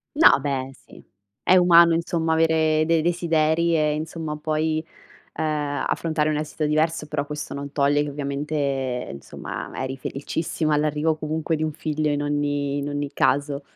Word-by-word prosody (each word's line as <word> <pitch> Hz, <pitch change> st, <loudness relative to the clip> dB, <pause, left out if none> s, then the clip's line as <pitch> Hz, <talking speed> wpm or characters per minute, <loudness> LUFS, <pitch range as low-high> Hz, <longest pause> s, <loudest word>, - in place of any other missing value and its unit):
No, 305 Hz, -, +7 dB
beh, 135 Hz, -2 st, -2 dB
sì. -, -, -17 dB, 0.4 s
È 185 Hz, -, +5 dB
umano, 170 Hz, -1 st, +7 dB
insomma, 165 Hz, -1 st, 0 dB
avere 160 Hz, -1 st, +3 dB
dei 165 Hz, -1 st, +3 dB
desideri 170 Hz, -1 st, +2 dB
e, 150 Hz, -1 st, +2 dB
insomma, 155 Hz, 0 st, -4 dB
poi, 155 Hz, +1 st, -1 dB, 0.5 s
uhm, -, -, -2 dB, 0.5 s
affrontare 155 Hz, -2 st, 0 dB
un 155 Hz, -, 0 dB
esito 155 Hz, 0 st, -2 dB
diverso, 155 Hz, +1 st, 0 dB
però 150 Hz, -1 st, -2 dB
questo 150 Hz, 0 st, -6 dB
non 140 Hz, 0 st, -6 dB
toglie 145 Hz, 0 st, +2 dB
che 150 Hz, -, -4 dB
ovviamente, 140 Hz, -3 st, -2 dB
insomma, 70 Hz, -, -7 dB
eri 130 Hz, 0 st, -4 dB
felicissima 155 Hz, +3 st, -2 dB
all'arrivo 150 Hz, +1 st, +1 dB
comunque 155 Hz, +1 st, -2 dB
di 155 Hz, -, -4 dB
un 155 Hz, -, -2 dB
figlio 155 Hz, 0 st, -2 dB
in 145 Hz, 0 st, 0 dB
ogni 145 Hz, -1 st, -1 dB
in 140 Hz, 0 st, -3 dB
ogni 145 Hz, 0 st, -3 dB
caso. 145 Hz, +1 st, +1 dB
150 Hz, 155 wpm, -23 LUFS, 145-160 Hz, 0.5 s, No